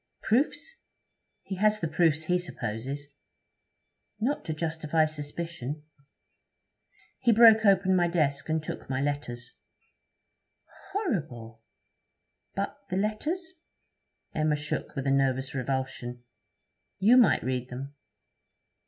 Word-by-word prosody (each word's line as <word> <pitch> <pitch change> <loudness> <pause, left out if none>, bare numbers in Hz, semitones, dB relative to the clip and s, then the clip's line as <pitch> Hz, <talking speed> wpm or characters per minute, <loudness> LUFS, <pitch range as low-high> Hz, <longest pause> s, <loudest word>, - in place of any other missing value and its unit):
'Proofs? 290 - 0 0.6
He 190 - -5
has 215 +2 +3
the 165 - -1
proofs 160 -1 +2
he 180 +3 +1
supposes.' 135 -3 -4 1.1
'Not 260 +7 0
to - - -2
justify 160 0 +1
suspicion?' 150 -1 -5 1.4
'He 240 - +4
broke 220 -1 +7
open 190 -1 +4
my 175 -1 +3
desk 155 -4 0
and 155 0 0
took - - -7
my 130 -1 -1
letters.' 130 -4 -3 1.4
'Horrible! 145 - -3 0.9
But - - -3
the 185 - -1
letters?' 305 - -2 0.8
Emma 155 -1 +2
shook 150 0 -4
with 135 -1 -3
a 135 - +2
nervous 135 -1 +1
revulsion. 130 -2 -3 0.7
'You 215 +6 +5
might 245 -4 +5
read 125 -1 -2
them.' 135 +3 -7
155 Hz, 110 wpm, -28 LUFS, 135-195 Hz, 1.4 s, broke